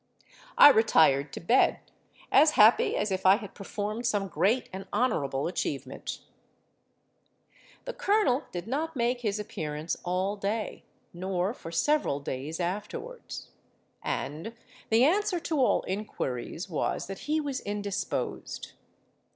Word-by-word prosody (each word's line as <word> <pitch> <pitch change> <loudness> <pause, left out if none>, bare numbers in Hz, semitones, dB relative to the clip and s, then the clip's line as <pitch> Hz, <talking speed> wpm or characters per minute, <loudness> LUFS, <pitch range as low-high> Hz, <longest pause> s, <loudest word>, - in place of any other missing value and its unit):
I - - +11
retired 160 - +4
to - - -5
bed, 235 +10 +3 0.5
as 305 0 +6
happy 215 +3 +5
as 210 -1 -1
if 190 0 -1
I 190 +1 +7
had 205 -2 -7
performed 210 +3 -4
some 200 -3 0
great 225 +8 +1
and 195 +1 -7
honourable 145 - 0
achievement. 140 -6 -4 1.6
"The - - -4
colonel 415 - +2
did 175 -1 -5
not 305 +6 -2
make 245 0 0
his 210 -3 -1
appearance 155 -5 -4
all 185 +3 -1
day—nor 195 -2 -3
for 165 - -9
several 290 - +1
days 140 +4 -5
afterwards; 210 - -5 0.5
and 165 +11 -4 0.3
the 225 +2 +5
answer 365 +4 +2
to 315 -3 -1
all 255 - +3
inquiries 185 - -4
was 165 -5 -2
that 195 0 -7
he 310 +1 +2
was 280 -3 -3
indisposed. 205 -1 -4
205 Hz, 125 wpm, -28 LUFS, 175-250 Hz, 1.6 s, I